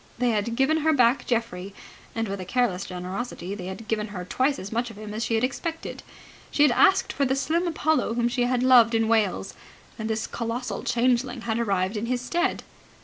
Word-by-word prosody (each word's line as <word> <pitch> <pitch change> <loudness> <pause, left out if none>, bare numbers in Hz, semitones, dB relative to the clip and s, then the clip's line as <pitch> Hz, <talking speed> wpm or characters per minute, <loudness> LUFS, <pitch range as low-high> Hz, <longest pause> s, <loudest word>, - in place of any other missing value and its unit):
They 245 0 +2
had 220 +2 -1
given 270 +5 +3
her 315 0 +2
back 250 -1 +3
Geoffrey, 200 -5 -2 0.4
and 225 -1 -1
with 200 0 -4
a - - -4
careless 195 -2 0
generosity 185 +1 -5
they 185 -3 -6
had 200 +4 -7
given 215 -1 -1
her 185 -4 -6
twice 265 +9 +1
as 195 - -7
much 235 +1 -1
of 225 - -12
him 210 0 -7
as 220 +2 -2
she 230 - 0
had 225 - +1
expected. 325 +5 -3 0.5
She 290 - +3
had 295 - +6
asked 385 +9 +4
for 280 - 0
the 265 0 +2
slim 330 +6 0
Apollo 315 -7 +1
whom 235 0 +2
she 245 0 0
had 250 0 +1
loved 245 -3 +6
in 225 0 +2
Wales, 210 -4 +1 0.5
and 220 0 -3
this 220 0 -1
colossal 235 +2 -4
changeling 245 +1 +1
had 225 0 -1
arrived 195 -2 0
in 220 +3 -3
his 250 0 0
stead. 345 +9 -1
235 Hz, 210 wpm, -25 LUFS, 210-255 Hz, 0.5 s, had